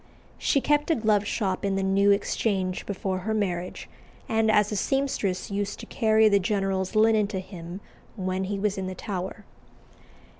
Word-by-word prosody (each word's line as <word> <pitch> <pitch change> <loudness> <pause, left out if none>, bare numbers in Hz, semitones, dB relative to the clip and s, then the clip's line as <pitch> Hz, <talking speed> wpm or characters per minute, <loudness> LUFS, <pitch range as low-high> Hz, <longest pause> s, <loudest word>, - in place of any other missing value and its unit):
She 275 - +2
kept 295 +2 +2
a 325 - +4
glove 215 -4 +2
shop 190 -5 -1
in 200 -1 0
the 195 - 0
New 195 +1 +3
Exchange 195 -2 0
before 190 -1 -2
her 220 +4 -2
marriage, 180 -4 -2 0.4
and 220 0 +2
as 210 -1 +3
a - - -1
seamstress 210 -6 -1
used 205 +1 -2
to - - -7
carry 220 -2 +3
the 200 -1 +4
general's 195 -1 -1
linen 215 -1 +4
to 200 -2 -3
him 180 0 -8 0.3
when 185 -2 -2
he 200 +1 -2
was 200 0 -1
in 190 - -3
the 185 - -5
Tower. 190 +1 -5
200 Hz, 175 wpm, -26 LUFS, 190-215 Hz, 0.4 s, a